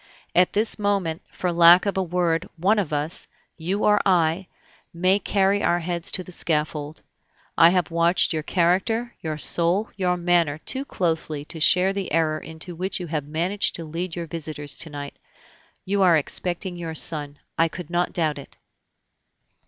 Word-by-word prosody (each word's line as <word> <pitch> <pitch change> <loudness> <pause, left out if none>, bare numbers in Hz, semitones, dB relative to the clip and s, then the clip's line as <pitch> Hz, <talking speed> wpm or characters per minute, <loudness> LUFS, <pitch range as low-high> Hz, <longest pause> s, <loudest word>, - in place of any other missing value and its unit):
"At 180 0 +3
this 215 +1 0
moment, 195 -6 -1
for 180 - -3
lack 170 +2 +7
of 200 - -1
a 190 - +1
word, 175 -2 -1
one 200 +6 +2
of 180 -7 -2
us 150 +3 -2 0.3
you 185 +5 -3
or 210 0 +4
I 180 -1 +1 0.4
may 185 +3 +2
carry 200 0 +1
our 175 - +2
heads 170 0 -2
to 185 - +4
the 180 - -12
scaffold. 150 -2 -2 0.5
I 165 - +7
have 180 -2 0
watched 170 +2 +3
your 155 - -1
character, 190 +9 0
your 155 -2 -4
soul, 175 +7 +1
your 180 -2 0
manner, 170 -4 +1
too 265 - -2
closely 160 - -2
to 160 - -5
share 180 +5 +4
the 195 -1 -4
error 155 -1 +1
into 160 +3 -6
which 185 +4 -3
you 180 - -5
have 150 -2 -2
managed 175 +7 0
to 165 - -6
lead 165 +2 -5
your 170 -1 -4
visitors 155 -3 -5
to 165 - -4
night. 145 -1 -8 0.7
You 200 +1 0
are 175 -4 +5
expecting 175 +4 -3
your 165 -2 -6
son, 145 -2 -1 0.2
I 165 - +3
could 170 0 -9
not 175 0 0
doubt 155 -4 -1
it." 140 - -13
170 Hz, 175 wpm, -23 LUFS, 160-185 Hz, 0.7 s, lack